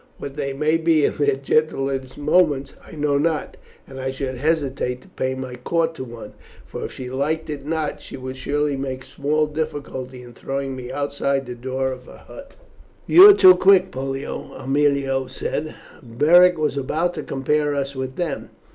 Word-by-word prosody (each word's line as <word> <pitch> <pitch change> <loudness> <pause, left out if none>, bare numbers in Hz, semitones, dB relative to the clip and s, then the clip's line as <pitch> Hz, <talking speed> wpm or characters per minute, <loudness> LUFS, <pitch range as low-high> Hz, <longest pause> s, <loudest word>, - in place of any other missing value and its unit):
What 140 -1 -7
they 140 -2 -2
may 150 +4 +1
be 160 -2 +3
in - - -1
their 145 - +2
gentler 135 -1 0 0.2
moments 145 -3 +2
I - - -14
know 145 -2 0
not, 155 0 -1 0.3
and 135 -1 -9
I 130 0 -2
should 135 -1 -4
hesitate 135 -4 -1
to - - -19
pay 130 0 -2
my 130 -1 -6
court 165 +6 0
to 145 - -7
one, 120 -2 -10 0.3
for, - - -7
if - - -6
she 125 -1 -7
liked 155 +4 -2
it 145 -1 -7
not, 160 -2 -2
she - - -9
would 130 0 -7 0.4
make 130 -1 -4
small 150 +3 0
difficulty 140 -4 -5
in 120 -1 -13
throwing 135 +2 -4
me 125 -1 -7
outside 140 -1 -1
the 125 - -6
door 130 +2 -3
of 130 -1 -9
her - - -14
hut." 280 0 -12 0.5
"You 380 +4 +9
are - - +10
too 185 - +9
quick, 190 0 +4
Pollio," 135 +1 -5
Aemilia 135 -1 0
said. 150 +3 -4 0.3
"Beric 160 +9 +5
was 150 -2 -1
about 160 +6 -1
to - - -5
compare 145 +2 0
us 140 0 -3
with 130 0 -4
them." 170 -5 -3
140 Hz, 180 wpm, -22 LUFS, 130-155 Hz, 0.5 s, are